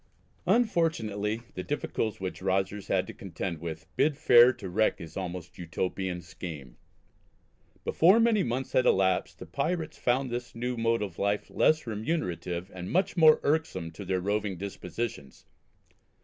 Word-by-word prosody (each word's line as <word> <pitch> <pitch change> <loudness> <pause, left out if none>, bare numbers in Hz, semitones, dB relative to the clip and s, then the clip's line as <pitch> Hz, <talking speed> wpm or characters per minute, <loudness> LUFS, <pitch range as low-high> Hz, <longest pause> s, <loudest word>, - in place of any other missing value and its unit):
Unfortunately 115 - +1
the 90 - -4
difficulties 110 -3 -2
which 95 -1 -5
Rogers 95 +1 -1
had 95 -1 +1
to - - -8
contend 90 -2 -5
with 80 -1 -6
bid 150 -2 +2
fair 120 -2 +7
to 100 - -8
wreck 110 +5 +2
his 80 - -10
almost 90 -1 -6
Utopian 90 +1 -3
scheme. 80 -7 -8 1.1
Before 185 +7 +5
many 225 -3 +4
months 130 0 -2
had 130 - +3
elapsed 95 -1 +2
the - - -9
pirates 160 - -2
found 125 +1 +1
this 120 0 -5
new 125 +2 -2
mode 115 -1 +1
of 95 -5 -6
life 100 +1 0
less 155 -2 +3
remunerative 105 - -3
and 90 0 -6
much 185 +2 +1
more 160 -3 +7
irksome 145 - 0
to 100 - -9
their 95 -1 -1
roving 100 0 -1
dispositions. 95 - -5
105 Hz, 150 wpm, -29 LUFS, 90-130 Hz, 1.1 s, fair